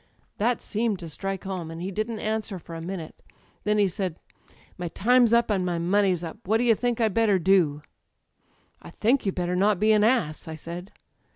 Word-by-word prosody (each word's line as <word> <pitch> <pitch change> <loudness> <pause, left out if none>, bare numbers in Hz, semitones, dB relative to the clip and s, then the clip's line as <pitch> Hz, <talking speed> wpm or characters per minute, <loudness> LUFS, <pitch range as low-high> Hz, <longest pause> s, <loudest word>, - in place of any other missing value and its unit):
''That 235 +3 +1
seemed 220 -1 -1
to 170 - -8
strike 195 +4 -4
home, 185 -4 -4
and 165 0 -7
he 185 +3 -4
didn't 215 +3 -3
answer 215 -2 -2
for 170 -1 -11
a 165 - -6
minute. 170 -2 -7 0.4
Then 210 0 +2
he 205 -1 +4
said: 185 -2 -3 0.6
'My 175 - -4
time's 240 +6 +3
up 235 -1 +3
and 190 -3 +1
my 175 -1 -1
money's 185 0 +2
up. 165 +4 -7
What 220 +3 +3
do 235 - 0
you 235 -2 +5
think 240 +1 -1
I'd 220 -3 +2
better 215 -3 +3
do?' 170 -5 +2 1.0
"'I - - -11
think 235 +1 +1
you'd 195 - -1
better 180 0 -1
not 200 +1 +2
be 215 +1 +4
an 210 -1 +4
ass,' 215 - +1
I 160 - -5
said. 170 +5 -8
195 Hz, 205 wpm, -26 LUFS, 175-220 Hz, 1.0 s, you